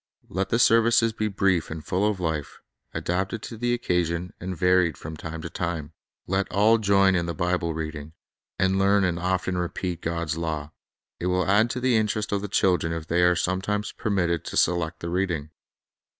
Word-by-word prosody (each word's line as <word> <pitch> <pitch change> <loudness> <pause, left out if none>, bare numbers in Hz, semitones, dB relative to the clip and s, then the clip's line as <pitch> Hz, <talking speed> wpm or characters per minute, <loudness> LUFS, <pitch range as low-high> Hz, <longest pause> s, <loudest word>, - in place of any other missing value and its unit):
Let 95 +2 -2
the 115 - +2
serv 115 -1 +5
ices 115 -1 +3
be 110 0 -1
brief 95 -4 +1
and 80 -1 -7
full 95 +3 +1
of 100 -3 -3
life, 80 -4 -3 0.3
adapted 95 +5 -2
to 115 - -6
the 120 +2 -1
occasion, 90 -5 -1
and 90 0 -5
varied 90 -3 +3
from 80 +1 -7
time 80 0 -7
to 85 - -5
time. 85 -3 -3 0.3
Let 95 +1 -1
all 110 +4 +4
join 100 -2 +4
in 85 -2 0
the 85 - -3
Bible 90 +1 0
Family 80 0 -2
reading, 80 0 -7 0.4
and 95 0 +2
learn 100 +1 +4
and 90 -2 0
often 90 0 -1
repeat 90 0 -3
God's 85 -1 -2
law. 80 -2 -3 0.5
It 90 - -2
will 90 0 +1
add 105 +4 +3
to 125 - -3
the 125 -2 +3
interest 105 0 -1
of 100 -1 0
the 105 - -4
children 90 -4 +2
if 80 -1 -4
they 85 +2 +1
are 90 0 +5
some 95 +2 0
times 105 +1 -2
permitted 90 - -1
to - - -4
select 85 -1 +1
the 85 - -4
reading. 85 -5 -1
90 Hz, 200 wpm, -25 LUFS, 85-100 Hz, 0.5 s, serv